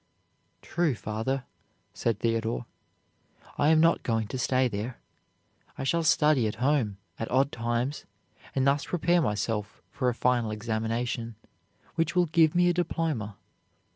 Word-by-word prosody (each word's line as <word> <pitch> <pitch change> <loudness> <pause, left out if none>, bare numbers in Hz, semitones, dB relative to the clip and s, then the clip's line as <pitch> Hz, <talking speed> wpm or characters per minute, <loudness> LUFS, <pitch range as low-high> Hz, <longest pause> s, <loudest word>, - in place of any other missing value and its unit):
"True, 170 -6 0
father," 115 +5 -2 0.5
said 115 -3 -1
Theodore, 115 +1 -1 0.9
"I 145 - +4
am 160 0 +5
not 165 +1 +4
going 115 -2 -1
to 130 - -4
stay 130 +1 +2
there; 115 +2 -4 0.8
I - - -4
shall 170 +5 +1
study 150 -6 +3
at 105 - -3
home, 125 -4 +1 0.2
at 115 - -3
odd 135 +3 +2
times, 120 +4 -2 0.5
and 135 -1 +2
thus 140 +1 +2
prepare 175 0 +2
myself 105 -3 -2
for 125 - 0
a 120 - -2
final 120 -2 +1
examination, 115 +1 -2 0.6
which 165 0 0
will 180 -1 +4
give 160 -1 +3
me 175 0 +4
a 175 - +3
diploma." 155 - -2
125 Hz, 140 wpm, -28 LUFS, 115-155 Hz, 0.9 s, am